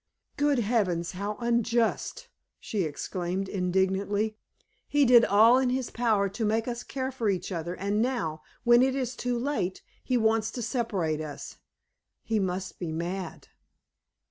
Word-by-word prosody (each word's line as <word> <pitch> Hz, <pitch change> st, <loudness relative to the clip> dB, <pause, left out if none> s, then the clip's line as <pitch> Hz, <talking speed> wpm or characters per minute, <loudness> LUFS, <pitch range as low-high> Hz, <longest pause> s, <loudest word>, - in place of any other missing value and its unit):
"Good 290 Hz, -1 st, +2 dB
heavens! 200 Hz, -7 st, 0 dB
how 200 Hz, +3 st, -4 dB
unjust!" 235 Hz, -, 0 dB, 0.3 s
she 210 Hz, -, -2 dB
exclaimed, 180 Hz, +5 st, -3 dB
indignantly. 190 Hz, +3 st, 0 dB, 0.5 s
"He 290 Hz, -1 st, +3 dB
did 240 Hz, -1 st, +7 dB
all 225 Hz, +5 st, +6 dB
in 260 Hz, -1 st, +1 dB
his 255 Hz, 0 st, -2 dB
power 220 Hz, -4 st, +2 dB
to 200 Hz, +4 st, -4 dB
make 220 Hz, +2 st, +1 dB
us 240 Hz, 0 st, -3 dB
care 260 Hz, +1 st, -4 dB
for 235 Hz, -5 st, -1 dB
each 185 Hz, -1 st, -2 dB
other, 170 Hz, 0 st, -3 dB
and 200 Hz, +3 st, 0 dB
now, 225 Hz, -12 st, -1 dB, 0.2 s
when 240 Hz, 0 st, +6 dB
it 260 Hz, 0 st, +2 dB
is 255 Hz, -2 st, -2 dB
too 245 Hz, 0 st, -1 dB
late, 235 Hz, -8 st, -2 dB, 0.2 s
he 255 Hz, -, +1 dB
wants 220 Hz, -1 st, +2 dB
to 240 Hz, -, -4 dB
separate 195 Hz, -, -1 dB
us. 150 Hz, -2 st, -7 dB, 0.7 s
He 225 Hz, -1 st, 0 dB
must 185 Hz, -1 st, -3 dB
be 170 Hz, -3 st, -3 dB
mad!" 170 Hz, +2 st, -5 dB
215 Hz, 150 wpm, -28 LUFS, 185-240 Hz, 0.7 s, did